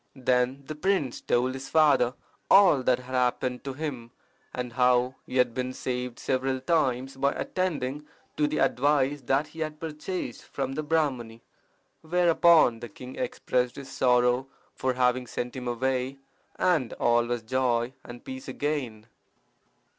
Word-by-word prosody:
Then 130 +1 +1
the 155 - -5
prince 155 -5 -1
told 125 +2 +1
his 135 0 -7
father 140 -6 +4 0.3
all 190 -9 +6
that 125 -1 +2
had 125 +1 -10
happened 125 0 0
to 135 - -3
him, 130 -5 -5 0.4
and 125 -1 -5
how 125 0 +3
he 130 - -3
had 125 -2 +3
been 130 +1 -3
saved 125 -1 -4
several 130 0 -1
times 130 -3 0
by 140 +1 +1
attending 150 -5 -2 0.3
to 150 - +2
the 150 +1 -2
advice 145 +1 +2
that 135 +4 0
he 160 - -12
had 155 -1 -4
purchased 155 -3 -5
from 135 -1 -4
the 155 - -2
Brahmani. 130 -8 -1 0.6
Whereupon 170 -6 +4
the 120 0 -8
king 125 +5 -10
expressed 130 - -1
his 135 -1 -9
sorrow 125 0 +2 0.3
for 130 0 -1
having 125 0 +1
sent 120 +2 -4
him 125 -1 -5
away, 130 +2 -1 0.4
and 160 -10 +1
all 120 0 +2
was 120 -1 -2
joy 125 0 0
and 120 0 -11
peace 265 +1 -7
again. 130 -8 -3
130 Hz, 150 wpm, -27 LUFS, 125-150 Hz, 0.6 s, all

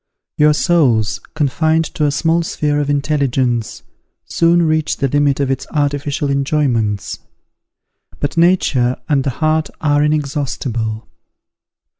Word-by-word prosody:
Your 150 0 +4
souls, 130 - +2 0.2
confined 160 +2 +1
to 150 - 0
a 145 - +2
small 165 +3 +1
sphere 150 -3 -1
of 145 -1 -2
intelligence, 135 -5 -1 0.4
soon 170 +1 +2
reach 155 -1 0
the 140 - 0
limit 145 0 +1
of 135 -2 0
its 135 - -3
artificial 145 -1 -1
enjoyments: 135 -7 -1 1.0
but 145 - -2
nature 165 -8 +2
and 145 -4 +1
the 135 - -1 0.2
heart 155 -1 +1
are 145 -2 +2
inexhaustible. 135 -7 -2
145 Hz, 120 wpm, -17 LUFS, 135-155 Hz, 1.0 s, Your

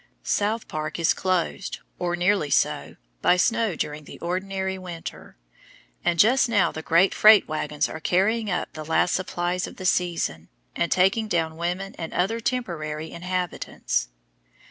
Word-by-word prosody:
South 215 +2 0
Park 155 0 -4
is 165 -1 +3
closed, 185 0 -1 0.2
or 175 -1 0
nearly 175 -3 +1
so, - - +1 0.3
by 180 - +4
snow 225 0 +2
during 150 -1 -4
an - - -9
ordinary 190 +2 -2
winter; 175 - -8 0.7
and 170 - +1
just 240 +7 +5
now 205 -5 +3
the 160 - -6
great 170 +4 +3
freight 215 -1 +7
wagons 155 0 -1
are 155 - -7
carrying 205 +7 +1
up 180 - -2
the 155 - -6
last 160 +3 +2
supplies 180 -1 -1
of - - -10
the 185 - -8
season, 170 - 0 0.3
and 170 - 0
taking 195 +5 +3
down 165 -4 0
women 180 +4 -3
and 165 - -5
other 200 +6 +1
temporary 160 -11 -3
inhabitants. 180 - -2
180 Hz, 150 wpm, -25 LUFS, 165-195 Hz, 0.7 s, freight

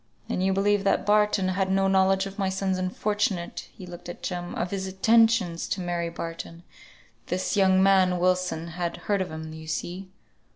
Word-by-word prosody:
"Then - - -2
you 190 +1 +2
believe 200 +1 +2
that 200 - +1
Barton 210 -2 +3
had 190 0 0
no 195 0 +2
knowledge 190 0 +3
of 195 +1 -8
my 195 -1 +1
son's 190 0 -1
unfortunate, 190 -1 -2
" - - -31
he 190 - -9
looked 175 0 -10
at 175 - -9
Jem, 175 -1 -4
"of 175 - -2
his 190 -1 -3
attentions 195 -3 +3
to - - -2
Mary 175 -1 -2
Barton. 165 0 -7 0.6
This 185 +3 -1
young 190 -1 +4
man, 190 -2 +4
Wilson, 180 -2 0
had 170 0 -3
heard 200 -2 +1
of 185 - -3
them, 160 0 -7
you 160 0 -10
see." 180 +4 -4
190 Hz, 190 wpm, -26 LUFS, 175-195 Hz, 0.6 s, young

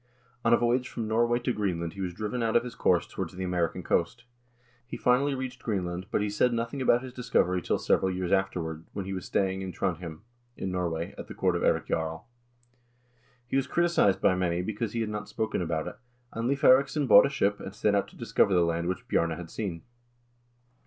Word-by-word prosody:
On 115 - +3
a 120 - +7
voyage 125 +2 +1
from 115 -2 -4
Norway 120 +2 +2
to 120 +1 0
Green 100 -6 -1
land 85 -1 -4
he 100 - -7
was 90 -2 -3
driven 110 +5 -3
out 115 -1 0
of 120 - +5
his 125 -1 -7
course - - +2
towards - - -6
the 95 - -4
American 90 -2 -1
coast. 105 +8 0 0.6
He - - -6
finally 135 +3 +2
reached 130 -1 -5
Greenland, 90 -4 -3
but - - 0
he - - 0
said 120 +4 +2
nothing 115 +4 -2
about 125 -1 +3
his 130 -1 -8
discovery 95 -8 +1
till - - 0
several 95 - +2
years 90 -1 -2
afterward, 85 -5 -1
when 100 -2 -4
he 95 - -4
was 95 -2 -5
staying 95 -1 0
in 95 -1 -4
Trondhjem, 85 -3 -3 0.4
in 95 - -3
Norway, 85 -2 -2
at - - -7
the - - -9
court - - +1
of - - -1
Eirik - - +2
Jarl. 80 +2 -2 1.2
He 125 - -4
was 135 -1 +1
criticized 170 - +3
by - - +4
many 90 -1 0
be 110 - -3
cause 105 0 -3
he 115 - -1
had 110 - -2
not 105 0 -5
spoken 110 -3 -2
about 80 -1 -2
it, 90 - -7 0.4
and 115 +2 -1
Leiv 140 0 0
Eiriksson 140 +3 +5
bought 120 - +8
a - - -4
ship, 105 -7 0
and 95 - -8
set 105 0 +1
out 100 - +1
to - - -17
discover 100 - +2
the 85 -1 +4
land 85 0 -1
which 90 0 -3
Bjarne 85 - +2
had 85 -2 -8
seen. 95 -7 -4
100 Hz, 225 wpm, -28 LUFS, 90-120 Hz, 1.2 s, bought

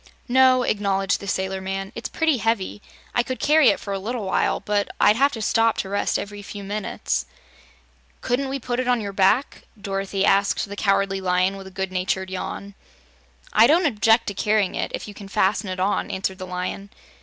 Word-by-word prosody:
"No," 255 0 +5
acknowledged 200 -3 0
the 200 - -8
sailor 190 0 -2
man; 195 +1 -4
"it's 230 - -6
pretty 320 -4 +1
heavy. 220 -3 -1 0.3
I - - +3
could 255 +1 -5
carry 305 0 +5
it - - +1
for 200 - -5
a 195 - -2
little 225 +2 -4
while, 190 - +1
but 205 -1 -1
I'd 210 - +5
have 275 +4 +3
to 225 - -4
stop 225 +1 +2
to 190 - -3
rest 200 +1 0
every 205 0 -6
few 205 0 -8
minutes." 205 +2 -3 0.9
"Couldn't 260 +2 -1
we 275 - -2
put 245 -1 -3
it 255 - -1
on 245 -1 +3
your 200 -2 -5
back?" 195 +8 +2 0.2
Dorothy 195 0 -2
asked 200 +1 +2
the 200 - -7
Cowardly 195 -1 +1
Lion, 185 +1 +1
with 195 -1 -9
a - - -8
good 190 0 -4
natured 190 0 -2
yawn. 200 +2 -5 0.8
"I 220 +2 +7
don't 335 +4 +4
object 225 -3 +3
to - - -5
carrying 210 -1 +1
it, - - -3
if - - -7
you 205 - -8
can 200 0 -10
fasten 195 +1 +1
it 185 0 -4
on," 195 +2 0
answered 190 0 -3
the 185 - -6
Lion. 180 +2 -4
200 Hz, 200 wpm, -23 LUFS, 190-230 Hz, 0.9 s, I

